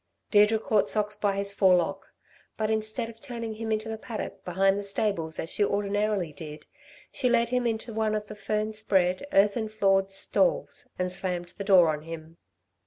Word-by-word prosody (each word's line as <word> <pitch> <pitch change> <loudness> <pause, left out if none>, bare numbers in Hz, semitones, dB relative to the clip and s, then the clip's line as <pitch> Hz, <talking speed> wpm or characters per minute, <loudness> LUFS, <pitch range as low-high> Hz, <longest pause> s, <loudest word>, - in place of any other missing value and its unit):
Deirdre 210 +1 +5
caught 215 -2 +1
Socks 210 -1 +1
by 200 -2 0
his 200 0 0
forelock; 190 0 +2 0.5
but 215 0 0
instead 220 +2 -1
of 225 0 -12
turning 235 -5 -5
him 220 +1 -4
into 215 +1 -1
the 220 0 -5
paddock 220 -1 -6
behind 195 +2 +2
the - - -5
stables 195 -5 -1
as 165 - -3
she 210 - +1
ordinarily 205 -4 0
did, 150 +1 -9 0.5
she 255 -3 0
led 235 -1 +3
him 250 -1 +1
into 225 0 -3
one 215 -1 0
of 210 0 -3
the 215 - -9
fern 215 +1 -2
spread, 190 +1 +1
earthern 210 +3 +3
floored 195 -2 +2
stalls 195 - 0
and 180 0 -1
slammed 180 -1 -3
the - - -2
door 190 -4 +6
on 155 -1 -1
him. 165 0 -9
205 Hz, 180 wpm, -27 LUFS, 190-220 Hz, 0.5 s, door